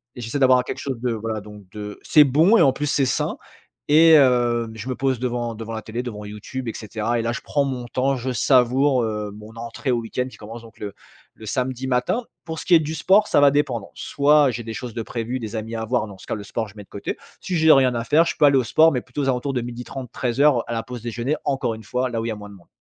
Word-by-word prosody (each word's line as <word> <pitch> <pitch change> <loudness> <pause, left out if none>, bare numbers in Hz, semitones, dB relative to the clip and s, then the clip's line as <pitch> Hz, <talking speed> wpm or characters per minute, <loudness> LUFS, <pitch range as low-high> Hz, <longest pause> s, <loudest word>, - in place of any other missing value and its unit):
et 125 - -8
j'essaie 115 +5 -3
d'avoir 130 -1 +5
quelque - - -6
chose 135 -4 -4
de, 125 -1 0
voilà, 110 0 -3
donc, 105 -2 -13
de 105 0 -8
c'est 150 -2 +6
bon 160 - +4
et - - +6
en 135 - +4
plus 150 +2 -3
c'est 140 -1 +2
sain 125 - -1 0.5
et 160 +1 +7
heu, 120 -4 +3
je 115 +4 -7
me 130 - -2
pose 135 -2 0
devant 120 -1 -3
devant 115 +1 -7
la 110 -1 -4
télé, 115 +3 -5
devant 105 -4 -7
YouTube 110 +5 -7
et 115 - -3
cetera 110 +2 -2
et - - 0
là 115 +1 -1
je 120 - -4
prends 145 -1 0
mon 130 -3 -3
temps. 130 +3 0
Je 130 +2 -3
savoure, 130 +2 +3
heu, 105 -2 -3
mon 105 +2 -12
entrée 115 +3 -4
au 120 - +1
week-end 125 +2 -3
qui - - -14
commence 115 +2 -10
donc, 115 - -16
le 100 -2 -6 0.4
le 110 - -12
samedi 130 +3 -2
matin. 125 - 0 0.2
Pour 160 -1 -6
ce - - -8
qui 180 - +2
est - - +7
du 155 +1 -4
sport, 195 +5 +4
ça - - +4
va 145 -1 +7
dépendre. 130 -7 -1
Soit 145 0 +3
j'ai 120 0 -5
des 115 - -6
choses 120 0 -6
de 115 - -4
prévues, 120 +3 -4
des 110 -1 -6
amis 110 +1 -4
à 110 - -3
avoir, 120 0 0
dans 100 -2 -11
ce - - -14
cas - - -2
le 105 - -7
sport 110 +2 -4
je 100 - -16
mets 105 - -9
de - - -25
côté. 100 - -5 0.2
Si 185 - -4
j'ai 160 0 +5
rien 130 -3 +5
à 115 - -1
faire, 155 +8 +4
je - - -2
peux - - +1
aller 140 -1 +5
au 130 - +2
sport, 160 +8 +5
mais 125 - 0
plutôt 125 +5 -6
aux 135 - 0
alentours 130 +2 -1
de 125 - -1
12:30-13:00 125 +2 -1
à 120 - -3
la 115 -1 -2
pause 125 -2 -8
déjeuner, 120 +5 -2
encore 135 -4 0
une 110 0 -10
fois, 125 +5 -1
là 115 -2 -3
où 115 - -3
il - - -2
y - - -1
moins 105 -1 -9
de 100 - -12
monde. 90 -3 -19
120 Hz, 280 wpm, -22 LUFS, 110-135 Hz, 0.5 s, et